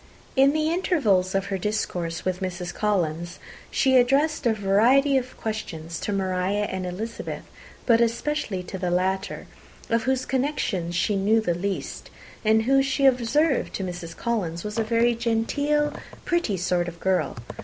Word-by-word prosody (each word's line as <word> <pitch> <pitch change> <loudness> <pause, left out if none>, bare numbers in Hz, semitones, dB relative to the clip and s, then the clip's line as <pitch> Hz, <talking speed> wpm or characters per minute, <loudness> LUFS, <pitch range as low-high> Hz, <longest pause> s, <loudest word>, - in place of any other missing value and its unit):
In 270 +1 +6
the 310 +1 +1
intervals 220 - +1
of 195 0 +1
her 190 - -1
discourse 175 -5 -2
with 185 -1 -1
Mrs. 180 -2 -4
Collins, 175 -5 -1 0.3
she 260 -1 +3
addressed 275 +3 +3
a 230 - +3
variety 235 +8 +4
of 255 -1 -1
questions 170 -7 -5
to - - -3
Maria 190 +1 0
and 190 -2 -3
Elizabeth, 220 +6 -5 0.4
but 230 -1 +5
especially 235 -4 -1
to 190 +1 -7
the 180 -1 -1
latter, 190 +2 -1 0.5
of 230 0 +2
whose 260 -1 +1
connections 250 - -1
she 205 +4 +1
knew 205 +3 +3
the 180 -6 0
least, 190 +3 -4 0.3
and 220 0 +4
who, 270 +3 +4
she 275 +1 +1
observed 265 +4 +2
to 195 - -3
Mrs. 175 -2 -6
Collins, 180 -8 -2
was 210 +1 -3
a - - +2
very 230 +2 +2
genteel, 285 +6 0 0.3
pretty 345 - 0
kind 180 -1 0
of 170 -1 -7
girl. 180 -9 0
210 Hz, 155 wpm, -25 LUFS, 185-255 Hz, 0.5 s, In